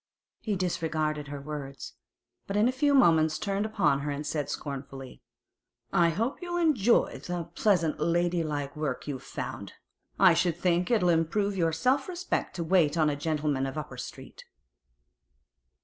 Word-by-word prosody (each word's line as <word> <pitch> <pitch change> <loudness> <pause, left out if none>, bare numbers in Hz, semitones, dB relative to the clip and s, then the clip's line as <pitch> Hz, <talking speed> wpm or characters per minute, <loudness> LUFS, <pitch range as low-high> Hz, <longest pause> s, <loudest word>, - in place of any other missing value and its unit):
He 210 -3 -2
disregarded 160 -4 -1
her 145 0 -6
words, 140 -2 -7 0.5
but 195 - -2
in 215 +3 +4
a - - +2
few 285 +2 +2
moments 160 - +4
turned 200 +4 -1
upon 195 -10 +2
her 145 +1 -3
and 145 +1 -4
said 150 -2 -2
scornfully: 135 -2 -6 0.7
'I 170 -1 +4
hope 225 - -2
you'll 350 0 -3
enjoy 265 - +2
the 175 -1 -4
pleasant, 170 -7 +1
ladylike 165 -3 0
work 150 -4 -3
you've 135 -3 -4
found! 135 - -6 0.5
I 190 -3 +7
should 170 -1 +1
think 175 0 +1
it'll 215 -7 +3
improve 175 +5 +1
your 165 -3 +1
self 255 - +1
respect 365 +1 -3
to 170 - -2
wait 165 -3 +3
on 155 -2 +3
the 145 - -1
gentlemen 145 -2 -1
of 135 - -6
Upper 150 -4 -6
Street! 125 - -9
165 Hz, 155 wpm, -28 LUFS, 150-195 Hz, 0.7 s, I